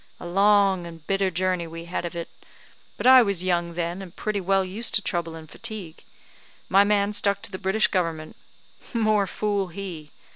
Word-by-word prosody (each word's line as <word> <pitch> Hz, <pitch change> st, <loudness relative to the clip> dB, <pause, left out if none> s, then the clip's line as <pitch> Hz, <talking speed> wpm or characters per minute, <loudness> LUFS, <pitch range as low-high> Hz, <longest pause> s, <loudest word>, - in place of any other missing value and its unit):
A -, -, -9 dB
long 195 Hz, 0 st, +3 dB
and 165 Hz, -2 st, -12 dB
bitter 195 Hz, +1 st, +1 dB
journey 185 Hz, -1 st, -1 dB
we 165 Hz, +1 st, -8 dB
had 175 Hz, 0 st, -3 dB
of 170 Hz, -, -6 dB
it; 170 Hz, -1 st, -4 dB, 0.7 s
but -, -, -5 dB
I 260 Hz, 0 st, +9 dB
was 200 Hz, -5 st, 0 dB
young 170 Hz, -2 st, 0 dB
then, 175 Hz, +2 st, -3 dB
and 180 Hz, -3 st, -10 dB
pretty 210 Hz, -2 st, -2 dB
well 195 Hz, +1 st, +2 dB
used 210 Hz, +5 st, -2 dB
to 215 Hz, -, +3 dB
trouble 170 Hz, -4 st, -2 dB
and 160 Hz, -1 st, -10 dB
fatigue; 205 Hz, -3 st, -7 dB, 0.7 s
my 195 Hz, +2 st, +6 dB
man 205 Hz, 0 st, +1 dB
stuck 200 Hz, 0 st, 0 dB
to 225 Hz, -, -7 dB
the 185 Hz, -, -6 dB
British 205 Hz, +3 st, +2 dB
government. 165 Hz, -4 st, -2 dB, 0.6 s
More 215 Hz, -3 st, +2 dB
fool 205 Hz, -1 st, -1 dB
he! 175 Hz, -4 st, -7 dB
190 Hz, 185 wpm, -25 LUFS, 170-200 Hz, 0.7 s, I